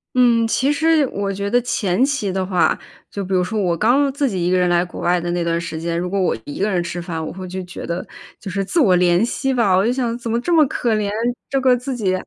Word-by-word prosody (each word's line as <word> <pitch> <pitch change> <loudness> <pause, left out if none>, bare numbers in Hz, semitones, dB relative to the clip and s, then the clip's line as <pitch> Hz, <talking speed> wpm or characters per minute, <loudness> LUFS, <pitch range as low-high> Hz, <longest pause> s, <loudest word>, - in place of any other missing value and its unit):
嗯， 240 -2 +4
其 265 +5 +1
实 315 -1 +3
我 200 -4 -3
觉 200 +1 -3
得 245 +2 +3
前 210 -3 0
期 270 -9 0
的 190 0 -1
话， 180 -2 +2 0.3
就 200 - -5
比 190 - -4
如 185 - +3
说 215 +4 -4
我 175 -2 0
刚 270 +7 +3
自 280 -1 0
己 185 -4 -2
一 180 - +1
个 185 - +3
人 180 0 +2
来 175 0 +3
国 175 - -9
外 175 0 +1
的 175 0 -3
那 175 0 -1
段 170 0 0
时 165 -1 -5
间， 170 0 -2
如 180 +1 -2
果 200 +2 -1
我 185 - +1
一 145 - -8
个 205 - +1
人 180 -3 0
吃 175 0 -5
饭， 165 -2 -4
我 - - -5
会 185 0 -8
就 185 +1 -5
觉 180 +1 -8
得 170 +1 -3 0.3
就 195 - -7
是 195 +1 -2
自 325 - +1
我 185 -7 +4
怜 175 +3 +3
惜 265 +2 -1
吧， 230 -7 +2
我 190 +3 +3
就 240 - +2
想 240 -3 -1
怎 235 -1 -6
么 230 - +1
这 350 - -2
么 315 -2 +6
可 235 -3 0
怜， 210 -1 -1 0.4
这 270 -1 0
个 255 -1 +4
自 255 +2 -4
己 200 -6 0
195 Hz, 305 characters per minute, -20 LUFS, 180-245 Hz, 0.4 s, 么